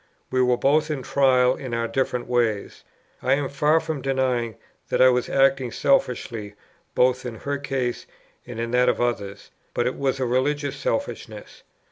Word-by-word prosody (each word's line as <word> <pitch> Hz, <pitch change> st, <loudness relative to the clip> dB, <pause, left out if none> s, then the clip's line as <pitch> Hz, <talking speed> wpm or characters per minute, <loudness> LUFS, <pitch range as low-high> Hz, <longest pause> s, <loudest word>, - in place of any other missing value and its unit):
We 130 Hz, 0 st, +2 dB
were 125 Hz, -1 st, +3 dB
both 150 Hz, +5 st, +2 dB
in 145 Hz, -4 st, -3 dB
trial 130 Hz, -2 st, +3 dB
in 125 Hz, -3 st, -5 dB
our 115 Hz, 0 st, -1 dB
different 125 Hz, 0 st, -1 dB
ways. 115 Hz, -4 st, -1 dB, 0.4 s
I 130 Hz, -, +2 dB
am 140 Hz, 0 st, 0 dB
far 150 Hz, +3 st, +3 dB
from 160 Hz, -3 st, -4 dB
denying 130 Hz, -4 st, 0 dB, 0.3 s
that -, -, 0 dB
I 130 Hz, -, +7 dB
was 125 Hz, -1 st, 0 dB
acting 135 Hz, -2 st, +2 dB
selfishly 115 Hz, -6 st, 0 dB, 0.4 s
both 125 Hz, 0 st, +3 dB
in 120 Hz, -2 st, -5 dB
her 140 Hz, 0 st, -2 dB
case 135 Hz, -3 st, -3 dB, 0.4 s
and 120 Hz, -2 st, -7 dB
in 115 Hz, 0 st, -3 dB
that 125 Hz, 0 st, +4 dB
of -, -, 0 dB
others; 100 Hz, -5 st, -3 dB, 0.2 s
but 120 Hz, -, +1 dB
it 125 Hz, -, -1 dB
was 135 Hz, -1 st, -1 dB
a 130 Hz, -, 0 dB
religious 140 Hz, +3 st, 0 dB
selfishness. -, -, -4 dB
130 Hz, 170 wpm, -24 LUFS, 120-135 Hz, 0.4 s, I